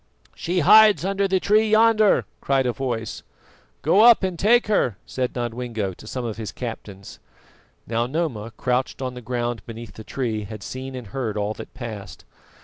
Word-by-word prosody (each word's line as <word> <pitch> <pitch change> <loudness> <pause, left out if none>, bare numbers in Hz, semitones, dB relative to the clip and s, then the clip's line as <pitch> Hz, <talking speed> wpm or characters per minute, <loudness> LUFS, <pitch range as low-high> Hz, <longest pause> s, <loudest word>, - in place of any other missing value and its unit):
"She 175 +1 -1
hides 215 +3 +7
under 195 0 +1
the 190 -1 +1
tree 215 +3 +3
yonder!" 220 -1 +4
cried 135 -1 +1
a 125 - 0
voice. 115 -4 -4 0.6
"Go 180 +8 +4
up 235 -2 +7
and 185 -3 -2
take 235 +4 +4
her," 125 - +1
said 125 -1 -3
Nodwengo 120 -4 -3
to 110 - -14
some 125 +1 -4
of 115 -2 -4
his 110 -2 -5
captains. 105 -5 -8 0.7
Now 115 +1 -1
Noma, 130 -7 -2
crouched 125 +1 -1
on 130 -1 -3
the 125 - -9
ground 120 -2 -3
beneath 115 -1 -9
the 110 - -10
tree, 110 -4 -3
had 105 0 -9
seen 130 +3 -6
and 125 -2 -7
heard 110 0 -4
all 105 +1 -1
that - - -11
passed. 110 -7 -8
125 Hz, 175 wpm, -23 LUFS, 115-180 Hz, 0.7 s, hides